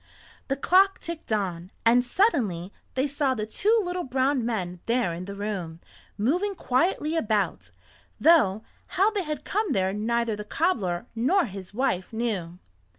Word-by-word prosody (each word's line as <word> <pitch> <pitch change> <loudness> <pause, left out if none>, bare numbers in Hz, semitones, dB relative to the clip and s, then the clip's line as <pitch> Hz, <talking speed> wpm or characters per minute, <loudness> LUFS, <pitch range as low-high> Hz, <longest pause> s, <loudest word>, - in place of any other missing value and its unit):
The 270 - 0
clock 375 +7 +4
ticked 335 -7 -7
on, 185 -4 -1 0.2
and 240 +2 +5
suddenly 240 - +1 0.2
they 260 +1 +2
saw 280 -2 0
the 215 -2 -2
two 430 - +2
little 360 0 -3
brown 260 0 +1
men 185 -7 -3
there 235 -6 +1
in 175 +2 -6
the 200 +1 -7
room, 195 -6 -4 0.4
moving 355 - 0
quietly 310 +3 0
about, 205 - 0 0.5
though 230 - +4 0.3
how 400 +4 +4
they 415 -2 -1
had 305 -2 -5
come 425 0 0
there 190 0 +1
neither 230 +1 0
the 210 - -6
cobbler 210 - 0
nor 305 +11 +2
his 195 -3 -8
wife 205 -5 -1
knew. 205 -7 -3
235 Hz, 155 wpm, -26 LUFS, 195-315 Hz, 0.5 s, and